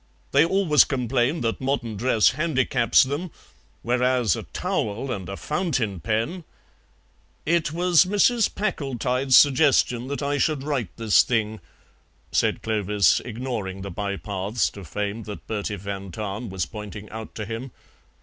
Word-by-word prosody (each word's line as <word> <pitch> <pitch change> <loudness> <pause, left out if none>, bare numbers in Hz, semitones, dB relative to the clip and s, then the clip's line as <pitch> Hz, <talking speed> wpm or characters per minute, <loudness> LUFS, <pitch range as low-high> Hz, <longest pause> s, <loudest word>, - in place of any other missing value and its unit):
They - - +5
always 170 -3 +4
complain 130 +3 0
that 115 +1 -2
modern 130 -4 -1
dress 115 0 +3
handicaps 135 -4 +2
them, 145 +7 -3 0.5
whereas 125 -3 +2
a - - -5
towel 115 +5 -3
and 95 -3 -5
a 95 - -5
fountain 145 - -1
pen 115 - -2 0.5
" - - -38
"It 165 -2 0
was 175 +1 +4
Mrs. 210 +4 +3
Packletide's 135 - +1
suggestion 135 -4 +4
that 140 +1 -4
I 145 0 0
should 150 -3 +1
write 140 - -2
this 110 -3 +5
thing," 110 -2 -1 0.7
said - - +1
Clovis, 105 -4 +2
ignoring 110 -6 -5
the 100 - -6
bypaths 100 +1 -2
to 100 - -10
fame 105 +6 -4
that 105 -1 -8
Bertie 105 -1 -3
van 100 0 -6
Tahn 105 +4 -5
was 95 -3 -2
pointing 105 +1 -8
out 110 0 -8
to 105 - -4
him. 115 +5 -5
120 Hz, 140 wpm, -24 LUFS, 105-140 Hz, 0.7 s, They